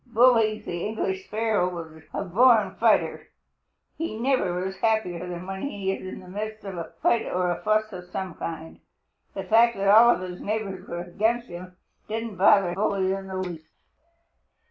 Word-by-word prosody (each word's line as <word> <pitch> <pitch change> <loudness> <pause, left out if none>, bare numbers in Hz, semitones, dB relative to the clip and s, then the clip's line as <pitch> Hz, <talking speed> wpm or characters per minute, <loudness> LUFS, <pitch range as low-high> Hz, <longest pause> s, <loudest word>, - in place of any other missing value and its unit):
Bully 230 -2 +4
the 175 -5 -5
English 190 -3 -3
Sparrow 210 -5 0 0.2
is 160 - -16
a - - -3
born 210 +1 +4
fighter. 225 -2 +2 0.7
He 325 -9 -3
never 220 -8 0
is 190 0 -5
happier 185 -6 0
than 175 0 -6
when 190 0 -5
he 200 -9 -2
is - - -4
in 185 - -7
the 185 - -14
midst 215 +3 -6
of 195 -2 -5
a 170 -1 -7
fight 230 - +2
or 180 -1 0
a 175 - -4
fuss 215 +2 +1
of 180 -1 -8
some 185 -1 -4
kind. 160 0 -7 0.6
The - - -3
fact 230 +1 +4
that 195 0 +1
all 235 +2 +8
his 180 0 -7
neighbors 200 -3 -4
were 170 0 -4
against 220 +7 -1
him 180 +1 -9 0.3
didn't 225 -2 -4
bother 190 -1 +5
Bully 195 -1 0
in 195 0 -5
the 190 0 -5
least. 175 -4 -5
195 Hz, 175 wpm, -25 LUFS, 180-220 Hz, 0.7 s, all